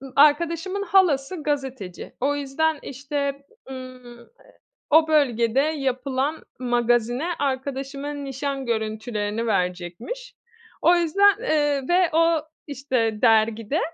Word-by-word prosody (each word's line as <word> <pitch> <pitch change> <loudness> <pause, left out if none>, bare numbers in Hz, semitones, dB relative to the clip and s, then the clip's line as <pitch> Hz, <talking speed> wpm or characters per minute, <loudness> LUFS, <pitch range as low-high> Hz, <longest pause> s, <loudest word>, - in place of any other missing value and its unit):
arkadaşımın 335 +6 +3
halası 340 -4 +2
gazeteci. 265 -10 -4
O 285 +3 +1
yüzden 290 +2 -1
işte, 280 +1 -4 0.3
ımm, 255 -2 -10
eee, 235 - -17 0.6
o 315 +1 +5
bölgede 255 -5 +2
yapılan 275 0 -1 0.2
magazine 240 +2 +1
arkadaşıma 275 +1 -3
nişan 275 -1 -4
görüntülerini 220 -1 -2
verecekmiş. 185 - -3 0.5
O 345 - +5
yüzden, 395 +5 +4
eee, 295 - +1
ve 355 -1 +4
o 330 0 +3 0.3
işte 255 -6 -1
dergide 225 +5 +3
275 Hz, 100 wpm, -23 LUFS, 240-310 Hz, 0.6 s, o